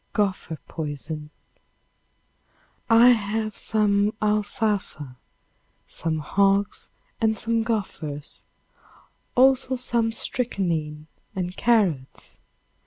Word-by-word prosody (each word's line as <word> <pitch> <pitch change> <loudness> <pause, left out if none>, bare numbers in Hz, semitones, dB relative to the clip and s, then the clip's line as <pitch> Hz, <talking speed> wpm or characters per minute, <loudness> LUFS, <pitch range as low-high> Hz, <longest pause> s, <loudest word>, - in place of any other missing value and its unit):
Gopher 190 -6 -1
Poison. 150 0 -5 1.6
I 230 +2 +8
have 215 -2 +1
some 210 -1 +2
alfalfa, 210 - -1 0.7
some 160 -1 -2
hogs 195 +5 +1 0.3
and 220 -1 +2
some 230 +2 0
gophers, 180 -10 -3 0.9
also 260 0 +4
some 235 -2 +1
strychnine 170 -11 -1 0.3
and 180 -1 -3
carrots. 195 - 0
205 Hz, 75 wpm, -24 LUFS, 160-225 Hz, 1.6 s, I